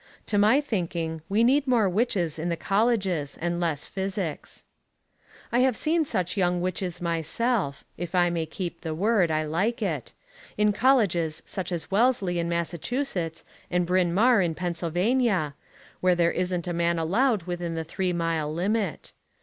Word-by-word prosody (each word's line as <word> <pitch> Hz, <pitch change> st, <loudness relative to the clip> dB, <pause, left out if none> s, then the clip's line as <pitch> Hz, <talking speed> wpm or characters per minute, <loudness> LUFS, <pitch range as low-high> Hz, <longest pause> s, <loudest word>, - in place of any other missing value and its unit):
To 205 Hz, -, +1 dB
my 220 Hz, +8 st, +5 dB
thinking, 170 Hz, -, -3 dB
we 210 Hz, +4 st, +3 dB
need 275 Hz, +4 st, +3 dB
more 235 Hz, -5 st, +3 dB
witches 180 Hz, -5 st, 0 dB
in 170 Hz, +2 st, -2 dB
the 170 Hz, -, -1 dB
colleges 195 Hz, -9 st, 0 dB
and 175 Hz, +1 st, -1 dB
less 165 Hz, -4 st, -1 dB
physics. 190 Hz, -5 st, -4 dB, 0.9 s
I 240 Hz, -, +2 dB
have 255 Hz, -2 st, +3 dB
seen 320 Hz, +1 st, +1 dB
such 185 Hz, -, -2 dB
young 180 Hz, -2 st, +1 dB
witches 180 Hz, -1 st, -3 dB
myself, 170 Hz, -, -1 dB
if 175 Hz, +1 st, -5 dB
I 175 Hz, -1 st, +4 dB
may 165 Hz, -2 st, -2 dB
keep 175 Hz, +2 st, -5 dB
the 160 Hz, -2 st, -4 dB
word: 200 Hz, -1 st, +2 dB
I 155 Hz, 0 st, +1 dB
like 190 Hz, +10 st, 0 dB
it, 155 Hz, -, -3 dB, 0.5 s
in 210 Hz, 0 st, +3 dB
colleges 195 Hz, -, +2 dB
such 190 Hz, -1 st, -5 dB
as 170 Hz, +1 st, -4 dB
Wellesley 200 Hz, -5 st, +2 dB
in 170 Hz, 0 st, -1 dB
Massachusetts 170 Hz, -, -2 dB, 0.2 s
and 180 Hz, 0 st, +1 dB
Bryn 180 Hz, 0 st, +2 dB
Mawr 225 Hz, +4 st, +4 dB
in 170 Hz, -3 st, 0 dB
Pennsylvania, 175 Hz, -, 0 dB, 0.5 s
where 185 Hz, -1 st, +3 dB
there 170 Hz, -1 st, +3 dB
isn't 180 Hz, -1 st, -2 dB
a 175 Hz, -, -1 dB
man 170 Hz, 0 st, +1 dB
allowed 205 Hz, +6 st, +2 dB
within 175 Hz, -1 st, -4 dB
the 165 Hz, -, -2 dB
three 180 Hz, +3 st, -2 dB
mile 165 Hz, -3 st, -1 dB
limit. 195 Hz, +2 st, -1 dB
180 Hz, 160 wpm, -26 LUFS, 170-210 Hz, 0.9 s, my